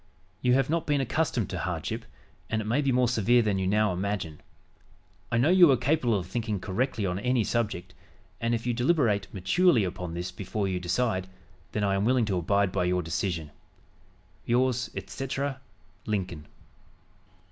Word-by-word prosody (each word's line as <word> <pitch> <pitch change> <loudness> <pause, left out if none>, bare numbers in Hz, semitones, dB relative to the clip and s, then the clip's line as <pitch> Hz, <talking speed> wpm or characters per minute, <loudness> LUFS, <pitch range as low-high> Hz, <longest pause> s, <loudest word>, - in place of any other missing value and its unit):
You 125 0 +4
have 135 -1 +2
not 165 +1 -1
been 145 -1 +2
accustomed 130 - 0
to - - -3
hardship, - - -3 0.4
and 110 - 0
it 110 - -3
may 120 +7 +1
be 140 -2 +1
more 125 0 +3
severe 120 +1 +3
than 100 -3 0
you 95 - 0
now 105 0 +2
imagine. 90 -4 -3 0.9
I 115 - +2
know 130 +7 +3
you 180 -3 +7
are 135 - +5
capable 125 -3 +1
of 90 - -4
thinking 110 +1 -2
correctly 110 +3 -1
on 90 0 -1
any 125 0 +1
subject, 100 -6 -2 0.5
and 115 +1 +1
if 115 - -5
you 120 - +1
deliberate 120 - +1
maturely 125 - +3
upon 90 -2 -4
this 90 +2 -4
before 100 +2 -3
you 95 -1 -1
decide, 95 +1 0 0.5
then 105 - 0
I 100 -1 +2
am 95 0 +1
willing 125 +1 +3
to 100 -3 -1
abide 100 +2 +1
by 90 -1 0
your 90 0 +1
decision. 80 -1 -2 0.9
"Yours, 125 -1 +1
etc., 135 0 -4 0.5
"LINCOLN." 90 -7 -3
110 Hz, 170 wpm, -28 LUFS, 95-125 Hz, 0.9 s, you